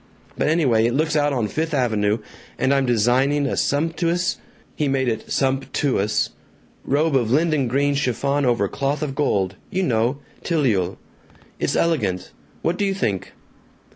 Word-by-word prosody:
but - - 0
anyway, 130 -9 +3
it 120 - -1
looks 155 +1 +1
out 145 -1 +2
on 120 -6 0
Fifth 160 +7 -2
Avenue, 110 -5 +1 0.4
and 135 - +2
I'm 135 -1 +2
designing 125 +5 +2
a 140 - -1
sumptuous 165 +4 0 0.2
" - - -32
He 150 - 0
made 135 -1 +1
it 110 -2 -3
"sump 135 0 0
too 140 -7 +1
ous" 105 +2 0 0.5
"robe 150 +2 +1
of 120 -4 +2
linden 150 0 +2
green 140 +4 +1
chiffon 140 +1 0
over 120 -6 +2
cloth 140 +7 -2
of 140 -3 -3
gold! 100 -10 0
You 190 +1 -1
know 120 -1 +1 0.3
tileul. 115 - +1 0.6
It's - - 0
elegant.... 105 - 0 0.3
What 175 - 0
do 205 - +2
you 195 -1 0
think?" 100 - -2
135 Hz, 165 wpm, -22 LUFS, 115-150 Hz, 0.6 s, anyway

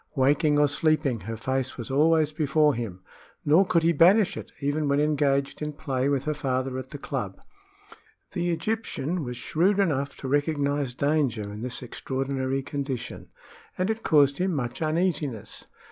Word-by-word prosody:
Waking 145 +2 +3
or 145 0 +5
sleeping, 145 -4 +1
her 115 +2 -6
face 130 +2 -2
was 120 0 -6
always 155 +2 +3
before 150 0 +2
him, 110 -7 -5 0.4
nor 165 +6 +5
could 170 -3 +2
he 165 - +4
banish 180 +6 +5
it - - -8
even 145 +1 -1
when 140 0 +2
engaged 145 -2 +1
in 150 0 -3
play 135 -3 -1
with 140 -2 0
her 150 - -1
father 130 -3 -2
at 130 0 -8
the 145 - -7
club. - - -4 0.9
The 175 -2 -1
Egyptian 175 -3 -2
was 125 -2 -5
shrewd 180 +10 +1
enough 145 -8 0
to 135 - -6
recognize 145 -2 0
danger 140 -6 +1
in 105 +1 -7
this 125 +1 -4
extraordinary 135 +1 -2
condition, 135 -3 -5 0.5
and 185 +4 +1
it 220 0 -4
caused 140 -3 +4
him 185 -1 0
much 120 -1 -3
uneasiness. 155 - -1
145 Hz, 160 wpm, -26 LUFS, 130-155 Hz, 0.9 s, or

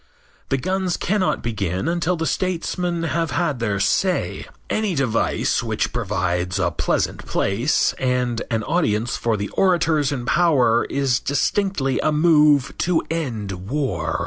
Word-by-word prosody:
The 135 - +1
guns 185 +5 -1
cannot 195 0 0
begin 100 - -2
until 170 +1 0
the 165 -1 -3
statesmen 175 -1 -1
have 165 0 -1
had 150 -7 -1
their 105 -4 -1
say. 185 - 0 0.2
Any 215 -5 -1
device 130 -5 0
which - - -2
provides 90 +1 -1
a 85 -3 +1
pleasant 75 - -1
place 115 +10 +1
and 125 -2 0
an 110 -3 -1
audience 120 -7 0
for 115 -2 0
the 100 0 -3
orators 165 -6 +2
in 125 -4 -3
power 130 -9 +3
is 135 -3 0
distinctly 145 -1 0
a 155 - +1
move 150 -3 +4
to 175 -2 +1
end 120 -12 -3 0.2
war. 115 - -1
140 Hz, 140 wpm, -21 LUFS, 115-170 Hz, 0.2 s, move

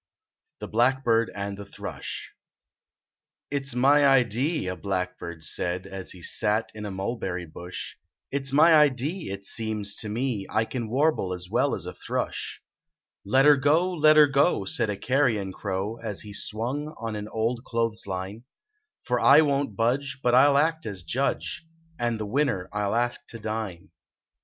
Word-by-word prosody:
THE - - -4
BLACKBIRD 120 -1 +2
AND 100 0 -4
THE 100 - -7
THRUSH - - -7 0.6
" - - -63
It 140 -1 -2
s 125 - -2
my 140 +3 +5
idee," 135 - +2
a 90 0 -2
blackbird 90 -4 -4
said, 90 +4 -2
As 95 -1 -7
he 90 -2 -9
sat 105 +1 0
in 105 -1 -6
a - - -5
mulberry 95 -2 -3
bush, 85 +3 -8 0.2
" - - -65
It 140 0 -2
s - - -2
my 155 +4 +6
idee 150 - +2
it 100 0 -6
seems 105 -2 -2
to 110 - -3
me 115 -2 -2
I 110 +2 +1
can 120 -2 -4
warble 135 -7 +1
as 90 0 -8
well - - +2
as - - -7
a - - -5
thrush." - - -4 0.3
" - - -63 0.3
Let 130 +7 +4
er 150 -1 +7
go, 160 +7 +2
let 155 -2 +5
er 150 - +9
go," 140 - +2
said 105 - -1
a 100 - -2
carrion 115 -5 +1
crow, 100 +3 -3
As 105 -4 -4
he 105 -1 -10
swung 125 +9 -3
on 115 -1 -4
an 105 0 -5
old 115 +2 -1
clothes 115 -4 -2
line, 95 +5 -5 0.3
" 425 0 -51
For 125 -1 +1
I 140 +6 +7
won 140 -2 +1
t 110 - -14
budge, 130 +5 0
but 120 - +3
I 130 +3 +7
ll 140 -1 +4
act 160 0 +1
as 95 -4 -6
judge 130 - -2 0.4
And 120 -2 -1
the 110 - -3
winner 110 -5 0
I 105 0 -1
ll 100 - 0
ask 120 +1 0
to 115 - -8
dine." 110 -5 -5
115 Hz, 185 wpm, -26 LUFS, 100-140 Hz, 0.6 s, er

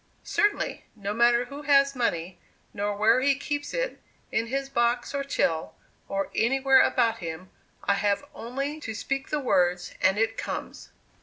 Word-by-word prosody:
"Certainly. 410 0 0
No 205 -1 -4
matter 235 +2 +4
who 280 +4 -8
has 275 -1 +4
money, 180 -7 -1 0.3
nor 205 0 -2
where 225 +4 +4
he 275 +1 +3
keeps 290 +1 -3
it, - - -2 0.3
in 225 +1 0
his 270 +3 -2
box 240 0 0
or 280 0 -1
till, 160 -12 -1 0.3
or 195 0 -2
anywhere 265 +3 +4
about 230 -1 +2
him, 170 +1 -7 0.3
I 200 - +3
have 200 0 0
only 275 +6 -4
to 225 -7 -6
speak 270 +4 -3
the 300 - 0
words, 180 -9 +1
and 190 +3 +3
it 225 +1 0
comes." - - -5
235 Hz, 160 wpm, -27 LUFS, 200-275 Hz, 0.3 s, matter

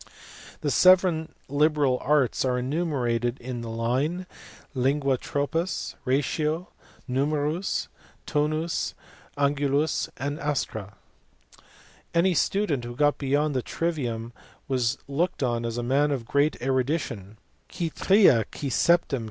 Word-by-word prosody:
The - - 0
seven 180 -4 +4 0.2
liberal 145 -2 +2
arts 140 -3 +2
are 125 -1 +1
enumerated 125 -4 -1
in 125 -1 -5
the 115 - -6
line, 130 +11 -1 0.5
Lingua, 135 +1 +1
tropuSj 165 +6 -2
ratio; 150 +5 0 0.4
numerus, 150 +7 0 0.4
tonus, 155 +3 -1 0.4
angulus, 145 +1 +1
astra. 140 - -3 1.2
Any 180 +2 +4
student 170 -6 +1
who 120 0 -6
got 145 +2 +2
beyond 145 +1 +1
the 130 - +1
trivium 120 -8 -3 0.3
was 125 -3 0
looked 145 +2 -1
on 120 -2 0
as 115 0 -4
a 120 - -2
man 140 +4 +2
of 135 -5 -2
great 140 +5 +1
erudition, 130 - -1 0.3
Qui 170 -3 -3
tria, 185 - +5
qui 140 -2 -4
septein. 165 -2 +3
140 Hz, 110 wpm, -26 LUFS, 125-155 Hz, 1.2 s, tria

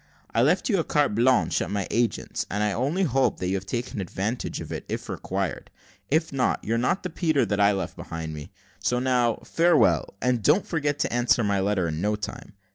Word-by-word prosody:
I - - +3
left - - +3
you 200 -7 +2
a - - +1
carte 145 -7 +1
blanche 125 +4 +3
at - - -2
my 100 -2 -1
agent's, 120 0 -1
and 105 +1 -1
I 105 - +1
only 140 - 0
hope 135 -5 +1
that 90 - -2
you - - 0
have 95 0 -3
taken 120 -3 -3
advantage 100 +6 -3
of - - -7
it, - - -4
if - - -4
required; - - -3 0.4
if 160 +1 +1
not, 130 -2 0
you're 115 +2 0
not 130 +11 0
the 180 - -4
Peter 155 -6 +1
that 100 0 -1
I 100 0 +5
left 95 -4 -3
behind 80 -1 -6
me. 75 -1 -8 0.3
So 125 - 0
now, 125 -2 +2
farewell, 165 -9 +3
and 125 -2 +1
don't 155 - +3
forget 145 -3 -1
to - - -1
answer 120 -1 +3
my 100 -1 +1
letter 95 -2 +1
in 80 0 -3
no 105 +2 +1
time. 105 0 -7
120 Hz, 215 wpm, -25 LUFS, 100-140 Hz, 0.4 s, I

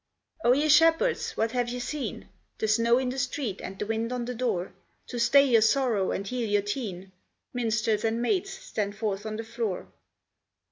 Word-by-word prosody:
"O 240 - +6
ye 290 +4 +2
shepherds, 325 - +4
what 225 0 +1
have 245 -1 0
ye 245 - -3
seen, 270 +4 -4 0.3
The 220 - -1
snow 230 +2 +4
in 260 -1 0
the 260 +2 -3
street, 250 -5 -2
and 190 - -7
the 210 - -3
wind 225 +2 -2
on 250 -1 -2
the 250 - -4
door, 220 -8 -2 0.4
To 245 - -4
stay 275 +4 +6
your 235 -5 +4
sorrow 220 -4 +2
and 195 - -2
heal 240 0 -2
your 205 -1 +2
teen?" 200 -4 -4 0.4
Minstrels 220 -3 0
and 225 +1 0
maids, 370 +11 0
stand 210 - -4
forth 210 -1 -2
on 215 - -4
the 225 - -4
floor. 225 -4 -4
230 Hz, 190 wpm, -27 LUFS, 215-255 Hz, 0.4 s, O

